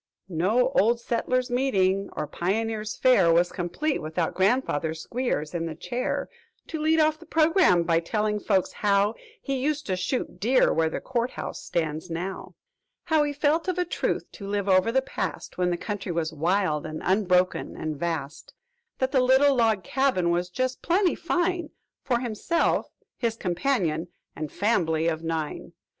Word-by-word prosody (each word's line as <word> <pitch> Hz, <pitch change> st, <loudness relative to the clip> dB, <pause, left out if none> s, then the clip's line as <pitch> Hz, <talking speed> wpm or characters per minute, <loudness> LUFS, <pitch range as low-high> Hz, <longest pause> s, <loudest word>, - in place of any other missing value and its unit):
"No 205 Hz, +9 st, +2 dB
Old 235 Hz, -2 st, +3 dB
Settlers' 250 Hz, +2 st, -1 dB
Meeting, 195 Hz, -7 st, +1 dB
or -, -, -3 dB
Pioneers' 215 Hz, +6 st, -2 dB
Fair, 200 Hz, -10 st, +4 dB
Was 175 Hz, +2 st, +3 dB
complete 190 Hz, -, -2 dB
without 165 Hz, +3 st, -2 dB
grandfather 185 Hz, -, +1 dB
Squeers 170 Hz, -, -3 dB
in 165 Hz, -1 st, -2 dB
the 160 Hz, -, -5 dB
chair, 240 Hz, +9 st, -3 dB, 0.4 s
"To 320 Hz, -, -4 dB
lead 320 Hz, +1 st, +3 dB
off 310 Hz, 0 st, +3 dB
the 335 Hz, -, -15 dB
programme 320 Hz, -, +4 dB
by 165 Hz, 0 st, +2 dB
telling 210 Hz, +4 st, -1 dB
folks 195 Hz, -2 st, +1 dB
how 205 Hz, +1 st, +2 dB, 0.3 s
'He 275 Hz, -1 st, -1 dB
used 300 Hz, +1 st, -1 dB
to 190 Hz, -, -1 dB
shoot 185 Hz, +8 st, -3 dB
deer 255 Hz, +5 st, +3 dB
where 160 Hz, 0 st, +2 dB
the -, -, -4 dB
Court 245 Hz, -1 st, -1 dB
House -, -, -6 dB
stands 160 Hz, 0 st, -3 dB
now' 180 Hz, +4 st, -5 dB, 0.5 s
"How 320 Hz, -3 st, +2 dB
'he 295 Hz, 0 st, +1 dB
felt, 300 Hz, +4 st, +1 dB
of 370 Hz, -1 st, -1 dB
a 360 Hz, -, +1 dB
truth, 350 Hz, -, -1 dB
to 200 Hz, -, -9 dB
live 200 Hz, 0 st, -1 dB
over 185 Hz, +3 st, +4 dB
the 265 Hz, +2 st, +2 dB
past, 190 Hz, -, -5 dB
When 180 Hz, -1 st, +2 dB
the 175 Hz, -, 0 dB
country 200 Hz, -1 st, -4 dB
was 165 Hz, -1 st, -2 dB
wild 165 Hz, -1 st, +1 dB
and 155 Hz, 0 st, -6 dB
unbroken 185 Hz, -2 st, +1 dB
and 155 Hz, -1 st, -3 dB
vast, 160 Hz, -1 st, -4 dB, 0.4 s
"'That 260 Hz, 0 st, 0 dB
the 265 Hz, -, +3 dB
little 265 Hz, +2 st, +5 dB
log 225 Hz, -5 st, +2 dB
cabin 255 Hz, -11 st, +1 dB
was 175 Hz, +1 st, 0 dB
just 255 Hz, +7 st, -2 dB
plenty 360 Hz, +1 st, +2 dB
fine 350 Hz, -1 st, -1 dB, 0.3 s
For 240 Hz, -3 st, 0 dB
himself, 245 Hz, +8 st, 0 dB, 0.3 s
his 230 Hz, -2 st, 0 dB
companion, 180 Hz, -, -1 dB, 0.3 s
and 155 Hz, -2 st, -5 dB
fambly 165 Hz, -7 st, +1 dB
of 160 Hz, -1 st, -1 dB
nine! 160 Hz, -2 st, -4 dB
205 Hz, 165 wpm, -26 LUFS, 170-260 Hz, 0.5 s, little